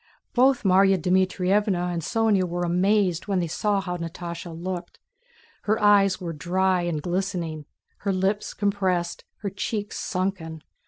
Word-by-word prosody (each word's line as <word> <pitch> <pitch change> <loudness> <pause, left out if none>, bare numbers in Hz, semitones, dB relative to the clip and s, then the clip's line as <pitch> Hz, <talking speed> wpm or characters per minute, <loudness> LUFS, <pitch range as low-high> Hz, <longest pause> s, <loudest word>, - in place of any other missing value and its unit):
Both 260 +1 +4
Márya 195 0 +5
Dmítrievna 185 +1 +1
and 170 - -2
Sónya 215 0 +2
were 175 0 -3
amazed 180 +1 +1
when 195 -2 0
they 175 - +1
saw 200 +5 0
how 180 -2 -3
Natásha 170 0 -6
looked. 175 +1 -6 0.7
Her 215 +1 +2
eyes 200 -2 +4
were 170 -3 -4
dry 185 +4 +1
and 170 -4 -2
glistening, 175 -4 -2 0.3
her 200 - -1
lips 195 +2 -1
compressed, 190 -4 -1 0.2
her 200 -2 -3
cheeks 205 +1 -3
sunken. 180 -5 -3
185 Hz, 140 wpm, -25 LUFS, 175-200 Hz, 0.7 s, Márya